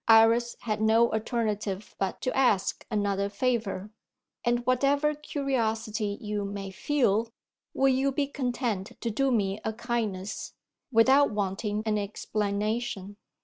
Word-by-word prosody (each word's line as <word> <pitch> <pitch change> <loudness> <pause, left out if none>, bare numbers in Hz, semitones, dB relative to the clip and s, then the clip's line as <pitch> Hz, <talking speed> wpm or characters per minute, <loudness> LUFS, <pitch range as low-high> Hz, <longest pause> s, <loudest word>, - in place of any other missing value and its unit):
Iris 230 +1 +5
had 215 -2 -2
no 225 +2 +4
alternative 215 -3 -2
but 195 -1 -2
to 255 - -1
ask 245 -8 +2
another 200 -2 0
favour. 210 -2 -1 0.5
"And 240 0 +1
whatever 280 +4 +3
curiosity 225 -8 -1
you 210 -1 -3
may 200 -1 -5
feel, 230 -1 +1 0.5
will 270 0 +4
you 265 +1 +2
be 280 +1 0
content 245 -8 -2
to 230 - -2
do 270 +5 +1
me 200 -4 +1
a 220 - -2
kindness 215 -4 -3 0.4
without 265 +5 +5
wanting 205 +1 -2
an 215 -1 +1
explanation?" 205 0 -2
220 Hz, 125 wpm, -28 LUFS, 205-245 Hz, 0.5 s, Iris